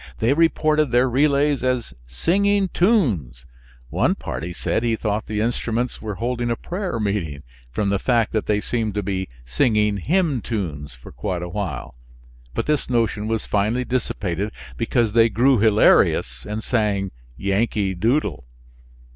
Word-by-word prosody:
They 115 +5 +2
reported 155 -2 +2
their 125 +2 +3
relays 140 +1 +2
as 125 -2 -1
singing 195 - +1
tunes; 110 - +1 0.5
one - - +2
party 85 +2 -5
said 90 - -1
he 115 -1 +1
thought 105 -1 -2
the 105 -1 -1
instruments 120 +1 -1
were 105 -2 -4
holding 120 +3 -2
a 115 - +1
prayer 180 - -4
meeting 90 -9 -2 0.3
from 100 - -1
the 100 -1 +1
fact 115 0 +1
that 110 - -1
they 105 0 +1
seemed 110 -3 -2
to 105 - -1
be 95 -1 -3 0.2
singing 105 - +2
hymn 155 - +1
tunes 75 - -4
for - - -13
quite 90 -2 -3
a 90 - -5
while, 90 -11 -4 0.6
but - - -1
this 150 -4 0
notion 115 -3 0
was 110 -1 -1
finally 110 +5 0
dissipated, 105 -6 -2 0.2
because 110 - 0
they 115 0 +5
grew 120 +4 +3
hilarious 100 - +3
and 105 +1 -3
sang 105 -5 0 0.3
"Yankee 100 0 0
Doodle." 115 - 0
110 Hz, 150 wpm, -22 LUFS, 100-125 Hz, 0.6 s, they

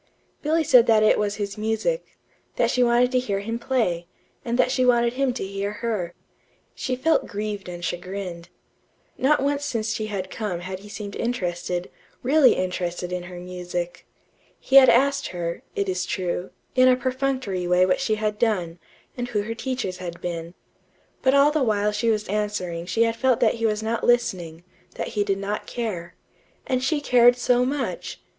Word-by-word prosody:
Billy 320 +2 +2
said 250 -5 +6
that 220 -1 +5
it 215 - +4
was 205 -1 0
his 205 0 -4
music; 225 - -2 0.4
that - - +2
she 250 - +1
wanted 245 +1 +4
to 255 - +3
hear 200 -6 -2
him 225 +3 -3
play, 220 -10 0 0.4
and 235 0 -1
that 255 - +3
she 255 -1 +2
wanted 240 -1 +3
him 270 0 +1
to 240 - -4
hear 200 +1 -3
her. 210 -6 -3 0.6
She 255 - -2
felt 320 +6 +1
grieved 205 -2 -4
and 175 0 -6
chagrined. 175 0 -5 0.7
Not 275 +1 +3
once 285 0 0
since 225 -6 -1
she 215 - -3
had 190 -3 -4
come 200 -6 -3
had 185 +1 -6
he 205 +2 -13
seemed 205 -1 -7
interested 180 -6 -2 0.4
really 280 +2 +5
interested 180 -1 -3
in 180 0 -2
her 180 -1 -8
music. 180 -1 -5 0.5
He 270 - +4
had 265 -1 +9
asked 275 +4 +3
her, 170 -2 -4
it 200 - -1
is 185 -1 -1
true, 180 0 -2 0.2
in 255 0 +5
a 255 - +6
perfunctory 255 -7 -2
way 180 +1 +4
what 185 - +1
she 220 -5 +1
had 210 -1 -2
done, 180 -7 0 0.4
and 245 -1 -3
who 210 -4 -1
her 225 +2 -4
teachers 235 -6 -3
had 175 -2 -7
been. 170 0 -5 0.7
But 265 0 +3
all 280 +1 +6
the 310 -1 0
while 210 -4 +2
she 210 +2 0
was 215 -1 0
answering 190 -5 -2
she 225 +5 +2
had 230 0 +1
felt 255 0 +2
that - - +4
he 225 - +3
was 215 0 -1
not 225 +1 -2
listening; 175 -9 +1 0.3
that - - -3
he 210 - 0
did 195 -1 0
not 200 +2 -4
care. 195 -8 -4 0.5
And 255 0 0
she 295 +2 +1
cared 245 -3 +5
so 245 0 +3
much! 275 -1 -3
215 Hz, 185 wpm, -24 LUFS, 185-250 Hz, 0.7 s, had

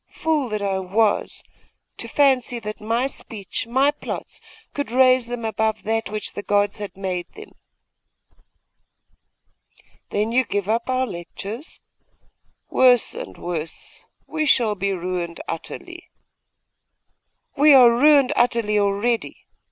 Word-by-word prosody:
Fool 305 -5 -1
that 215 -1 -3
I 195 -1 0
was, 205 +3 0 0.5
to - - -4
fancy 260 -4 +2
that 215 -1 -7
my 230 +4 0
speech, 225 -6 -6
my 265 +4 +3
plots, 295 - -7 0.3
could 285 -5 -3
raise 255 0 +4
them 240 -1 -5
above 220 0 -1
that 225 -1 -1
which 215 0 -4
the - - -5
gods 205 +1 +1
had 205 -2 -7
made 185 -2 -4
them!' 425 0 -12 2.6
'Then 210 +2 -1
you 255 +2 +3
give 205 -4 -3
up 230 +3 -1
our 255 0 +1
lectures? 205 - -7 0.9
Worse 250 -2 +4
and - - -8
worse! 165 -2 -5 0.2
We 310 -1 -2
shall 230 -6 +4
be 200 0 -2
ruined 180 -2 -3
utterly!' 350 - -7 1.5
'We 300 +1 +6
are 245 -3 +8
ruined 280 +2 +5
utterly 230 -3 +2
already. 205 +4 -1
225 Hz, 125 wpm, -22 LUFS, 205-255 Hz, 2.6 s, are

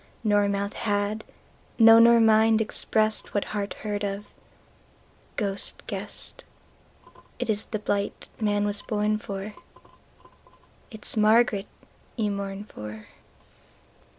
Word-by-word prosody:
Nor 205 -2 +3
mouth 200 0 -2
had, 205 0 -1 0.5
no 225 0 +8
nor 235 0 +7
mind, 220 0 +5
expressedWhat 215 -1 0
heart 205 -1 -4
heard 205 -1 -2
of, 200 +1 -4 1.0
ghost 200 -2 -3
guessed:It - - -8
ís 210 -1 0
the 215 - -2
blight 205 -1 -2
man 205 -1 +1
was 205 0 -1
born 215 0 0
for, 200 0 -6 1.4
It 220 -3 -11
is - - 0
Margaret 215 -1 +3 0.5
you 215 -3 0
mourn 200 0 -4
for. 105 - -10
210 Hz, 105 wpm, -26 LUFS, 200-220 Hz, 1.4 s, no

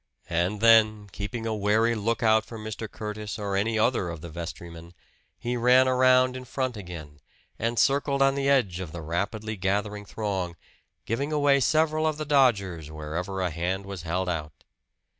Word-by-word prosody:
And 90 +5 0
then, 110 -2 +5
keeping 110 +5 -5
a 110 - -1
wary 110 +3 +2
lookout 110 0 +2
for 115 - -9
Mr. 110 0 -6
Curtis 105 0 -6
or 100 -2 -3
any 110 +3 +1
other 110 -5 +1
of 85 -2 -7
the 85 -1 -8
vestrymen, 85 0 -8 0.4
he 120 +1 -3
ran 125 +2 +5
around 130 0 +4
in 130 - -6
front 130 -1 -3
again, 85 -7 -9 0.4
and 115 +2 -1
circled 140 +1 +2
on 135 0 +4
the 140 0 0
edge 110 -11 +2
of 90 -4 -6
the 85 -2 -6
rapidly 105 +7 -3
gathering 105 +2 -2
throng, 95 -5 -3 0.5
giving 140 +7 -2
away 145 -2 +3
several 155 +2 +2
of 155 -1 -1
the 155 - -4
dodgers 100 - +2
wherever 80 +5 -4
a 90 -2 0
hand 90 +4 -2
was 100 -3 -6
held 90 +3 -2
out. 75 -4 -4
105 Hz, 170 wpm, -26 LUFS, 90-125 Hz, 0.5 s, then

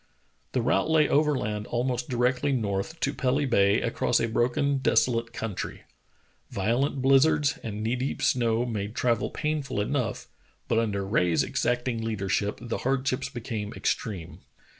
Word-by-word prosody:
The 125 - +1
route 130 +5 +2
lay 155 -2 +4
overland 130 -9 +1
almost 125 0 -1
directly 125 +3 +1
north, 110 +4 -2
to 140 - +1
Pelly 135 +2 +1
Ba}' 100 -4 +3
across 120 +1 +1
a 115 - +1
broken, 135 +5 +1
desolate 115 -3 +2
country. 115 -4 -5 0.7
Violent 125 +7 0
blizzards 140 +2 +4
and 105 -1 -5
knee 115 +3 0
deep 130 +2 -3
snow 120 -1 +2
made 110 -2 -4
travel 120 -3 +1
painful 150 -6 -2
enough, 125 +3 -2 0.4
but 115 - +2
under 100 -4 -1
Rae's 90 -5 +2
exacting 120 -1 -1
leadership 105 -2 -1
the 120 -1 -4
hard 135 +1 0
ships 130 +1 -1
became 110 -4 -5
extreme. 95 -7 -3
120 Hz, 140 wpm, -27 LUFS, 110-135 Hz, 0.7 s, lay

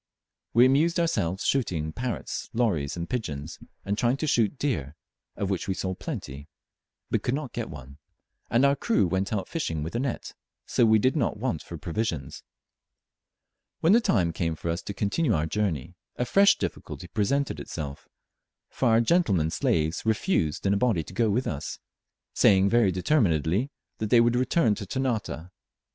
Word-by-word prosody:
We 120 +2 +7
amused 155 +7 +3
ourselves 100 - 0
shooting 85 - 0
parrots, 125 -1 -4
lories, 90 -12 0
and 85 0 -4
pigeons, 85 - -4 0.3
and 100 - 0
trying 120 +2 +2
to 155 - -2
shoot 120 -3 +2
deer, 80 - -2 0.4
of 100 -1 -2
which 95 - -2
we 95 - -1
saw 95 0 -2
plenty, 70 -4 -7 0.6
but - - +1
could 125 - 0
not 145 -3 -5
get 120 -2 -4
one; 70 0 -11 0.5
and 120 +4 +4
our 140 0 +4
crew 225 - +2
went 95 +3 -1
out 105 -3 -2
fishing 80 - -2
with 80 - -5
a 120 - -1
net, 130 -2 -3 0.3
so 120 - +3
we 110 0 +6
did 130 +7 +2
not 125 -7 0
want 110 -8 -2
for 85 - -8
provisions. 85 - -3 1.4
When 170 +5 +5
the 235 - +6
time 90 - +1
came 80 -1 -1
for 85 - -5
us 85 +3 -3
to 100 - -6
continue 110 - +1
our 75 0 0
journey, 85 -4 -2 0.2
a 125 - -1
fresh 200 - +5
difficulty - - -5
presented 110 - 0
itself, 70 0 -7 0.6
for 130 - 0
our 115 +1 +5
gentlemen 100 - +2
slaves 80 +1 0
refused 110 - 0
in 100 - +3
a - - +2
body 105 -7 +1
to 85 - -12
go 115 +2 +2
with 120 +6 +1
us; 75 -2 -4 0.6
saying 95 -1 +5
very 115 -5 +4
determinedly 95 - +1 0.3
that 110 - -2
they 120 - +6
would 120 +1 +4
return 125 -1 +2
to 100 -1 -6
Ternate. 110 - -2
105 Hz, 175 wpm, -27 LUFS, 85-125 Hz, 1.4 s, We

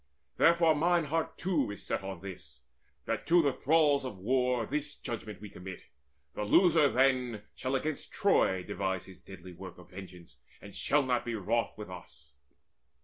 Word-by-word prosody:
Therefore 165 -1 +5
mine 170 +3 +2
heart 160 +2 -2
too 170 - 0
Is 100 - -8
set - - -1
on 95 -3 -7
this, 70 -8 -10 0.4
that - - -3
to 170 0 +5
the 140 -2 +2
thralls 145 -1 +3
of 125 -7 -6
war 125 +3 +1
This 145 +3 -3
judgment 110 -4 -6
we 105 - -8
commit: 95 -2 -9 0.5
the - - -3
loser 155 - +5
then 125 -5 +1
Shall 130 +1 -2
against 150 +2 -3
Troy 145 - +2
devise 95 -2 -3
his 95 - -14
deadly 90 -1 -11
work 95 +2 -10
Of 90 - -15
vengeance, 90 -2 -11 0.2
and - - -12
shall 145 0 +2
not 125 -2 0
be 120 -1 -3
wroth 110 +3 -1
with 105 -3 -8
us." 70 -6 -12
120 Hz, 170 wpm, -31 LUFS, 95-145 Hz, 0.5 s, Therefore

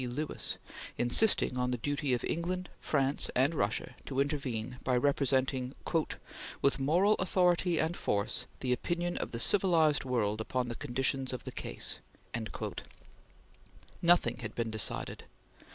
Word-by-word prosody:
Lewis, 145 +5 -2 0.4
insisting 125 - +4
on 125 0 +1
the 125 - -1
duty 145 +3 -1
of 120 -2 +1
England, 180 +2 -2
France, 140 -1 +1
and 135 +5 +3
Russia 155 - -1
to 135 -1 -2
intervene 130 -5 -2
by 125 -1 +2
representing, 130 -1 +1 0.9
"with 140 - +3
moral 175 +10 +4
authority 180 -2 +2
and 160 +3 +1
force, 100 -9 0
the 125 -1 +1
opinion 175 +7 -2
of - - -3
the 115 - -4
civilized 165 - +3
world 110 -4 0
upon 125 +2 -2
the 120 - -4
conditions 135 +2 -1
of 125 - -5
the - - -6
case." - - -4 2.0
Nothing 175 0 +4
had 115 -3 -6
been 115 -1 -2
decided. 110 -1 -1
135 Hz, 135 wpm, -31 LUFS, 125-165 Hz, 2.0 s, insisting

